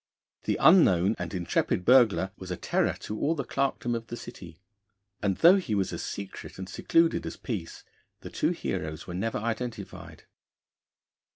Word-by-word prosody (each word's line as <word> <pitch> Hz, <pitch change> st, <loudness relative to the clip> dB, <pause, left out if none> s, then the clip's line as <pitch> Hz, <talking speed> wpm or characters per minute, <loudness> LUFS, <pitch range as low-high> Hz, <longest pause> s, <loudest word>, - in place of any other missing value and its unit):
The -, -, 0 dB
unknown 105 Hz, -, +5 dB
and 90 Hz, -1 st, -4 dB
intrepid 90 Hz, 0 st, -1 dB
burglar 115 Hz, -7 st, +5 dB
was 95 Hz, -, -10 dB
a 90 Hz, -, -3 dB
terror -, -, 0 dB
to 105 Hz, -, -5 dB
all 160 Hz, +3 st, +1 dB
the 140 Hz, -, -2 dB
clerkdom 135 Hz, -3 st, -1 dB
of 115 Hz, -1 st, -4 dB
the 120 Hz, -, -6 dB
City, 90 Hz, -9 st, -11 dB, 0.6 s
and 100 Hz, -2 st, 0 dB
though 175 Hz, +4 st, +7 dB
he 145 Hz, -, -2 dB
was 95 Hz, -2 st, -1 dB
as -, -, -4 dB
secret 100 Hz, -1 st, -7 dB
and 95 Hz, 0 st, -6 dB
secluded 165 Hz, -, +2 dB
as -, -, -6 dB
Peace, 100 Hz, -10 st, -6 dB, 0.4 s
the -, -, -9 dB
two -, -, 0 dB
heroes 80 Hz, +1 st, -4 dB
were 90 Hz, -, -7 dB
never 105 Hz, +6 st, -2 dB
identified. 115 Hz, -2 st, -5 dB
105 Hz, 165 wpm, -28 LUFS, 90-125 Hz, 0.6 s, though